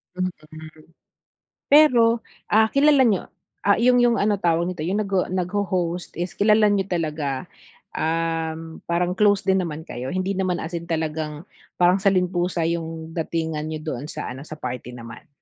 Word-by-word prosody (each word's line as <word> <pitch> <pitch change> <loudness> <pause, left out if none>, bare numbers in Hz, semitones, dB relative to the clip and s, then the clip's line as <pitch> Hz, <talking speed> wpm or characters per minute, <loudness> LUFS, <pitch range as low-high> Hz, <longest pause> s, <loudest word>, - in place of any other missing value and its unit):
Mm. 185 0 -1 1.4
Pero, 240 -6 +6 0.3
ah, 220 +1 +5
kilala 280 -1 +5
niyo 200 -5 0 0.3
ah, 200 - +4
'yung 245 +1 +4
'yung 240 -1 +4
ano 205 -1 +1
tawag 170 -1 +1
nito, 180 -4 -4
'yung 190 +6 0
nagho 195 -3 0
nag-ho-host 180 -1 -2
is 175 +1 -3
kilala 210 +1 +4
niyo 195 -1 0
talaga, 150 -6 -2 0.5
um, 165 0 -2
parang 175 +1 +1
close 205 0 +3
din 190 -1 +2
naman 160 -2 -5
kayo, 125 +2 -6
hindi 185 +1 -1
naman 185 -1 0
as 165 - -5
in 170 0 -5
talagang 155 -1 -3 0.4
parang 180 +2 +4
saling 190 -2 +2
pusa 175 -1 -1
'yung 165 -1 -4
datingan 160 -2 -2
niyo 155 -1 -4
doon 135 +5 -7
sa - - -5
ano 130 +3 -8
sa 155 - -7
party 125 -2 -6
naman? 120 +7 -11
175 Hz, 160 wpm, -23 LUFS, 160-200 Hz, 1.4 s, Pero